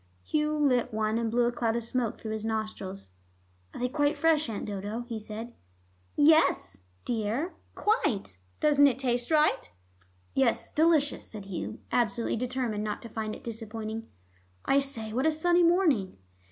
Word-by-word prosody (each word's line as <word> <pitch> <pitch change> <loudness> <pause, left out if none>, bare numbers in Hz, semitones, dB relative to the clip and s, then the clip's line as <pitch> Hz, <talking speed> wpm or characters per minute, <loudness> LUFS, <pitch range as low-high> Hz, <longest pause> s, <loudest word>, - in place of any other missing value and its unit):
Hugh 305 0 0
lit 260 -5 +2
one, 215 +1 0
and 230 -1 -1
blew 240 +1 +2
a 240 - +2
cloud 230 -1 0
of 235 - -1
smoke 235 -1 -2
through 220 - -5
his 220 -1 -3
nostrils. 215 - -4 0.6
"Are - - -9
they 250 - +1
quite 290 +2 +1
fresh, 315 -4 +3
Aunt 215 - -4
Dodo?" 205 +3 -4
he 235 -2 -5
said. 220 +2 -7 0.6
"Yes, 290 - +4 0.2
dear, 235 - -1 0.2
quite. 230 - 0 0.3
Doesn't 290 -1 +6
it 255 -3 +1
taste 245 -2 -1
right?" 310 -1 +2 0.6
"Yes, 265 -4 +1
delicious," 310 -2 +3
said 210 -3 -9
Hugh, 195 +3 -5
absolutely 235 -1 +1
determined 245 -3 -2
not 210 +2 -4
to 230 - -8
find 215 -1 -4
it - - -13
disappointing. 225 0 -5 0.6
"I 275 - +4
say, 230 -6 -3
what 260 +6 +1
a - - +4
sunny 345 +3 +3
morning!" 335 - +3
235 Hz, 160 wpm, -29 LUFS, 220-290 Hz, 0.6 s, Doesn't